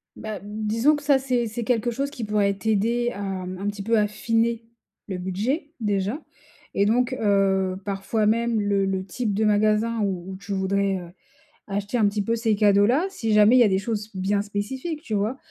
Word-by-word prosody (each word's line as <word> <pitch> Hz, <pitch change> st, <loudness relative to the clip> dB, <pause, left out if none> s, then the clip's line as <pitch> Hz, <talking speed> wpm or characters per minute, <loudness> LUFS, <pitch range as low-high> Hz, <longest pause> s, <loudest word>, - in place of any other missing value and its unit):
Bah, 215 Hz, -2 st, -6 dB
disons 220 Hz, +7 st, +1 dB
que 290 Hz, -, -7 dB
ça 285 Hz, -2 st, +4 dB
c'est 250 Hz, -3 st, 0 dB
c'est 230 Hz, +2 st, -4 dB
quelque 240 Hz, 0 st, 0 dB
chose 275 Hz, +4 st, -2 dB
qui 265 Hz, -5 st, -7 dB
pourrait 205 Hz, -1 st, +1 dB
t'aider 225 Hz, +4 st, 0 dB
à, 200 Hz, -, -7 dB
mmh, 185 Hz, -2 st, -4 dB
un 200 Hz, -, -3 dB
petit 205 Hz, -1 st, -4 dB
peu 225 Hz, +2 st, +2 dB
affiner, 225 Hz, +2 st, 0 dB, 0.4 s
le 190 Hz, -3 st, -4 dB
budget, 230 Hz, -, -2 dB
déjà 210 Hz, +6 st, -1 dB, 0.5 s
et 200 Hz, -, +2 dB
donc, 245 Hz, +4 st, +2 dB
heu, 195 Hz, -2 st, +2 dB
parfois 200 Hz, +2 st, -1 dB
même 230 Hz, +1 st, +1 dB
le 200 Hz, -1 st, +1 dB
le 190 Hz, -1 st, -1 dB
type 215 Hz, +2 st, -2 dB
de 215 Hz, +2 st, +1 dB
magasin 215 Hz, +2 st, +2 dB
où 190 Hz, -2 st, -2 dB
où 190 Hz, -, -7 dB
tu 200 Hz, -, -9 dB
voudrais, 195 Hz, 0 st, 0 dB
heu, 175 Hz, -2 st, -8 dB, 0.6 s
acheter 205 Hz, +4 st, -2 dB
un 215 Hz, -3 st, +4 dB
petit 205 Hz, +1 st, -1 dB
peu 230 Hz, +3 st, 0 dB
ces 225 Hz, -2 st, +1 dB
cadeaux-là 210 Hz, -, +4 dB
si 225 Hz, -, -2 dB
jamais 210 Hz, +3 st, +6 dB
il -, -, +7 dB
y -, -, +8 dB
a 220 Hz, -, +5 dB
des 190 Hz, -, +2 dB
choses 210 Hz, +1 st, -3 dB
bien 195 Hz, +2 st, 0 dB
spécifiques, 255 Hz, +10 st, -4 dB
tu 240 Hz, -9 st, -6 dB
vois? 215 Hz, +6 st, 0 dB
210 Hz, 200 wpm, -24 LUFS, 200-235 Hz, 0.6 s, y